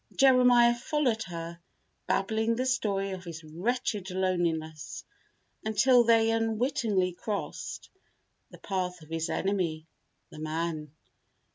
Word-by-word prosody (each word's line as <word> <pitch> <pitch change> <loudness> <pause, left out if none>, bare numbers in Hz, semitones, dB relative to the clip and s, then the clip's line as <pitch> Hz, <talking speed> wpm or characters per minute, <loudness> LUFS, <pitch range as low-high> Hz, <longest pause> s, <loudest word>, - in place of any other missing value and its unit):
Jeremiah 250 -3 +6
followed 245 -1 0
her, 170 -1 -6 0.5
babbling 220 +3 +1
the 255 +2 -1
story 200 -6 0
of 185 -1 -6
his 165 -2 -8
wretched 200 +5 -2
loneliness, 170 -4 -2 0.6
until 235 +3 +5
they 225 -1 +4
unwittingly 225 -4 +1
crossed 205 +3 -5 0.6
the - - -13
path 180 -3 -3
of 155 - -16
his 165 0 -2
enemy, 175 -5 -1 0.5
the - - -10
man. 155 -1 -3
195 Hz, 110 wpm, -29 LUFS, 170-235 Hz, 0.6 s, Jeremiah